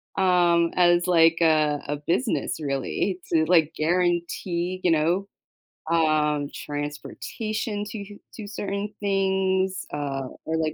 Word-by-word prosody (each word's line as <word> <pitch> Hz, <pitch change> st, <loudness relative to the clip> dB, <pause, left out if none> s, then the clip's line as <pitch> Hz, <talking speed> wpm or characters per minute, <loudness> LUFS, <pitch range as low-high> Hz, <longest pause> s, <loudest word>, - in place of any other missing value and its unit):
Um, 175 Hz, -3 st, +3 dB
as, 175 Hz, 0 st, +4 dB
like, 165 Hz, -2 st, +5 dB
a, 155 Hz, -2 st, +3 dB
a 145 Hz, 0 st, -2 dB
business 170 Hz, -, -1 dB
really 150 Hz, +6 st, -2 dB
to, 160 Hz, -1 st, +4 dB
like, 165 Hz, -2 st, +3 dB
guarantee, 175 Hz, +2 st, -1 dB
you 180 Hz, -, +3 dB
know, 170 Hz, +5 st, +1 dB, 0.6 s
um, 150 Hz, -3 st, +2 dB
transportation 205 Hz, +9 st, -4 dB
to 205 Hz, -1 st, -8 dB, 0.2 s
to 215 Hz, -3 st, -7 dB
certain 200 Hz, 0 st, -4 dB
things, 190 Hz, -1 st, 0 dB
uh, 135 Hz, -2 st, -3 dB, 0.2 s
or, 160 Hz, 0 st, -1 dB
like. 155 Hz, -1 st, -1 dB
175 Hz, 115 wpm, -25 LUFS, 155-190 Hz, 0.6 s, like